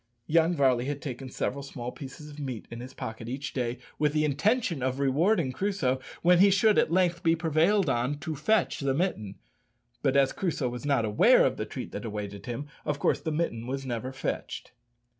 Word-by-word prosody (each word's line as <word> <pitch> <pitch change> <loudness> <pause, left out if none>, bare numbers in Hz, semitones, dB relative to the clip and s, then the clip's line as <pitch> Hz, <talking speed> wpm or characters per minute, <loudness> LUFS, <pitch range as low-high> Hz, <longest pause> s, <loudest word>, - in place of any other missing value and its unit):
Young 165 +3 +3
Varley 130 -4 +3
had 145 +1 -3
taken 130 -2 -6
several 140 +2 -2
small 125 -3 -6
pieces 140 +3 -9
of 145 - -11
meat 130 -6 -5
in 115 - -6
his 125 +2 -8
pocket 110 -1 -6
each 140 +3 -4
day, 125 -1 -2 0.2
with 150 -1 +2
the 155 0 +2
intention 170 - +1
of 130 +1 -1
rewarding 145 +3 +2
Crusoe 165 -7 0 0.2
when 175 0 +6
he 200 +2 +7
should 200 +2 +4
at - - +2
length 175 -1 +2
be 165 0 +3
prevailed 165 +4 +2
on 130 +2 0
to 150 +2 -4
fetch 185 +10 +1
the 135 -1 0
mitten; 120 - -1 0.7
but 140 -1 +2
as 135 -1 +4
Crusoe 160 -9 -1
was 125 +4 -6
not 135 -6 +2
aware 105 -1 +5
of - - +1
the - - -3
treat - - -6
that - - -5
awaited 105 -1 -6
him, 125 +4 -4 0.2
of 145 - -1
course - - +1
the 160 - -3
mitten 135 -8 -2 0.2
never 120 -1 -3
was 130 0 -8
"fetched." - - -4
140 Hz, 200 wpm, -28 LUFS, 125-165 Hz, 0.7 s, he